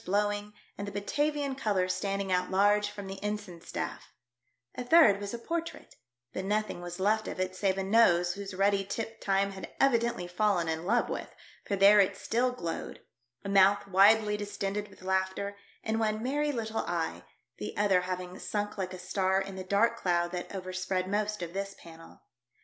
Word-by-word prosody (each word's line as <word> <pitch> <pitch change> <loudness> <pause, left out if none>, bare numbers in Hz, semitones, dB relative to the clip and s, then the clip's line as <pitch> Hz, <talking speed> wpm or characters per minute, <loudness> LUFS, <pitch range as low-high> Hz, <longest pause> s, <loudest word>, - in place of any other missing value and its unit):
l6l - - -22
blowing, 205 +1 0 0.3
and 200 - -4
the - - -5
Batavlan 290 +7 -1
colours 200 -8 0
standing 195 -1 -2
out 180 0 +1
large 205 +2 +3
from 205 -1 -8
the 195 +1 -7
ensign 205 -5 -4
staff; - - -5 0.6
a 250 - -5
third 245 -7 +6
was 200 0 -4
a 235 - -4
portrait, 330 +7 -5 0.4
but 190 - -3
nothing 210 -2 -1
was 175 +1 -7
left 215 +3 +2
of - - -5
it 185 0 -1
save 195 0 0
a 195 - -1
nose 180 -4 +4
whose 200 0 -7
ruddy 195 +1 +2
tip 225 +3 -5
time 195 0 +2
had 190 -1 -8
evidently 235 -7 +2
fallen 180 -1 +1
in 160 +1 -2
love 235 +3 +2
with, - - -4 0.4
for 200 - 0
there 200 +2 +7
it 195 0 +3
still 245 +5 +1
glowed; 170 -10 -5 0.4
a - - -3
mouth 200 +1 +4
widely 210 +2 +5
distended 205 0 -3
with 195 -2 -17
laughter, 190 +2 -1 0.3
and 220 0 -1
one 215 0 0
merry 295 +3 0
little 225 -4 -2
eye, 170 -2 -2 0.4
the 105 - -5
other 195 -3 +3
having 180 0 -5
sunk 205 -1 -3
like 185 -1 -3
a - - -8
star 190 +1 0
in 195 0 -5
the 190 - -5
dark 205 +5 +2
cloud 175 -4 0
that 180 0 -5
overspread 185 0 -2
most 210 -1 -1
of 170 0 -6
this 195 0 -4
panel. 165 0 -14
200 Hz, 185 wpm, -30 LUFS, 185-210 Hz, 0.6 s, there